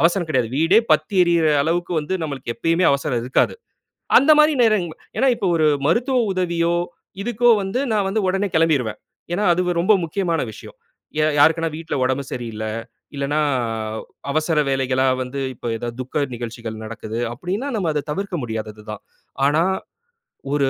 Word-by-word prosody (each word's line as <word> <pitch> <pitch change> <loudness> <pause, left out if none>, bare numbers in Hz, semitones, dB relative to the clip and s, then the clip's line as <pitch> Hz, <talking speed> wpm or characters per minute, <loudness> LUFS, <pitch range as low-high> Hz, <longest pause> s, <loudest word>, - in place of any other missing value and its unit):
அவசரம் 175 0 +2
கெடையாது. 125 -7 0
வீடே 165 +7 +5
பத்தி 205 - +1
எரிகிற 170 -2 +2 0.2
அளவுக்கு 175 +3 -1
வந்து 150 +5 -3
நம்மளுக்கு 135 -5 -4
எப்பயுமே 165 +2 +2
அவசரம் 140 -3 -1
இருக்காது. 130 - +1 0.6
அந்த 295 +4 +5
மாரி 305 +1 +6
நேரங்கள் 200 -8 +1 0.2
ஏன்னா 270 - +3
இப்போ, 195 - -2
ஒரு 160 -1 +2 0.2
மருத்துவ 250 - +2 0.2
உதவியோ 170 -2 0 0.5
இதுக்கோ 240 +2 +2
வந்து 195 +6 -2
நான் 205 -2 +1
வந்து 210 +3 0
ஒடனே 195 +2 +1
கெளம்பிடுவேன். 145 -10 +2 0.4
ஏன்னா, 200 +4 0
அது 175 - 0 0.2
ரொம்ப 200 +5 +4
முக்கியமான 170 -1 -1
விஷயம். - - -12 0.4
யா 155 - +4
யாருக்குனா 165 +3 +4
வீட்ல 165 0 -4
ஒடம்பு 130 +2 0
சரியில்ல. 115 -3 -5 0.5
இல்லன்னா, 140 +2 -1 0.9
அவசர 155 +1 0
வேலைகளா 130 -1 +1 0.2
வந்து 130 +2 -4
இப்போ 120 - -8
ஏதாவது 120 +1 -6
துக்க 140 +3 -1
நிகழ்ச்சிகள் 115 -2 -6
நடக்குது 110 0 -6
அப்டின்னா, 185 - -3
நம்ம 190 -6 0
அத 150 -1 -1
தவிர்க்க 195 +2 -3
முடியாதது 110 -2 -5
தான். 105 - -7 0.4
ஆனா, 150 +4 +3 0.9
ஒரு 140 -2 +2
160 Hz, 150 wpm, -21 LUFS, 130-185 Hz, 0.9 s, மாரி